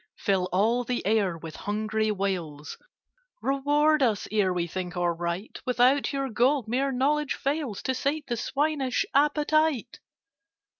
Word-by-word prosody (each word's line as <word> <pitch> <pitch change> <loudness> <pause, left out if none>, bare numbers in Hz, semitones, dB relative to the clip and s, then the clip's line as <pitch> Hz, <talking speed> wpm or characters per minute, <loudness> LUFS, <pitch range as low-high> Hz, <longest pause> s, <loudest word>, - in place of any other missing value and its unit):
Fill 185 -2 0
all 225 +6 +2
the 245 0 -3
air 200 -5 +1
with 160 -1 -9
hungry 215 +1 -1
wails— 180 -8 -3 0.6
"Reward 290 +3 +2
us, 225 -6 +1
ere 205 -3 +2
we 175 -1 -1
think 180 +1 -5
or 175 -1 +1
write! 170 +4 -4
Without 250 +3 +3
your 275 -1 -2
Gold 250 +1 +1
mere 265 +4 0
Knowledge 285 +3 +1
fails 275 -7 -2
To 260 - 0
sate 280 +4 -1
the 240 - -2
swinish 275 +1 0
appetite!" 295 -3 +2
240 Hz, 140 wpm, -27 LUFS, 195-275 Hz, 0.6 s, Without